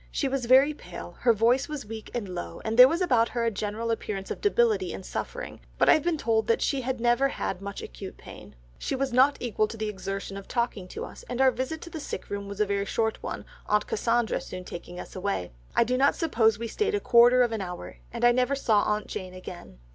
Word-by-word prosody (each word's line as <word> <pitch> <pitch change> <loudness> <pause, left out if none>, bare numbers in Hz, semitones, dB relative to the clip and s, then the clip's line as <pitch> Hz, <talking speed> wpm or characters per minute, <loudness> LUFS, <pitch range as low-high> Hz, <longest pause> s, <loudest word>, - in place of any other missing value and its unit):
She 280 - -1
was 265 -2 -2
very 270 +4 +6
pale, - - -9
her 240 - +4
voice 235 +6 +2
was 300 -5 -5
weak 220 0 -8
and 230 -4 -2
low, 85 - -6
and 220 0 -1
there 250 +2 +10
was 335 +6 -1
about 245 -10 +3
her 235 - -2
a 230 - +2
general 215 +3 -3
appearance 200 -3 -4
of - - -5
debility 425 -2 +2
and - - -7
suffering, - - -5 0.2
but - - +3
I - - +9
have 310 - +3
been 340 +1 0
told 225 -5 +1
that 230 - +3
she 275 -2 0
never 240 +2 +2
had 195 -8 -4
much 200 0 -6
acute - - -8
pain. - - -12 0.2
She - - -2
was 265 -1 -1
not 265 +3 +5
equal 215 -3 0
to 225 - -8
the 215 -1 -2
exertion 195 0 -5
of 200 - -9
talking 235 -6 -2
to - - -6
us, - - -11
and 245 - -3
our 265 -1 +6
visit 260 +6 -4
to 340 - -9
the 320 - -5
sick - - -6
room 200 0 -4
was 200 0 -7
a 210 - +4
very 200 0 -1
short 220 +2 -1
one, - - -5 0.2
aunt 210 0 +2
Cassandra 230 +1 0
soon 185 0 -7
taking 175 +1 -8
us - - -9
away. 185 - -2 0.2
I - - +5
do 250 +2 0
not 280 +1 +4
suppose 225 - +2
we 230 +1 -4
stayed 420 - 0
a - - +1
quarter 245 -4 +6
of 240 - 0
an 220 -2 -2
hour, 180 -2 -7
and 235 0 0
I 240 - +7
never 255 +3 +2
saw 220 -6 +3
aunt 210 0 0
Jane 185 -1 -6
again." 175 - -10
230 Hz, 245 wpm, -27 LUFS, 205-260 Hz, 0.2 s, there